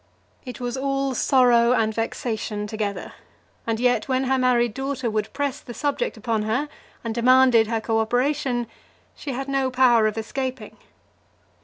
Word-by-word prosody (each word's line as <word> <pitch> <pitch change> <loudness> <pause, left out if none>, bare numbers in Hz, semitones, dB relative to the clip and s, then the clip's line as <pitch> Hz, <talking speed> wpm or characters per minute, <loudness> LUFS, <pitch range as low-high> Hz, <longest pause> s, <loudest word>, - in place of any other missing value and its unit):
It 250 - -8
was 245 +1 -3
all 275 0 -1
sorrow 245 -2 +4
and 220 -3 +1
vexation 220 -2 -3
together; 205 -3 -4 0.5
and 225 -1 -1
yet 245 0 +1
when 260 0 0
her 265 0 +1
married 240 -3 +2
daughter 270 -2 -3
would 215 0 -2
press 285 -2 -2
the 240 - -10
subject 305 +12 -2
upon 225 -3 -1
her, 240 +8 -1 0.3
and 230 -2 -3
demand 255 +2 +5
her 225 0 +3
co 225 0 0
operation, 245 +2 0 0.5
she 280 - -6
had 270 +2 -4
no 270 -1 0
power 250 -4 +4
of 215 - -3
escaping. 255 0 -4
245 Hz, 155 wpm, -23 LUFS, 225-265 Hz, 0.5 s, demand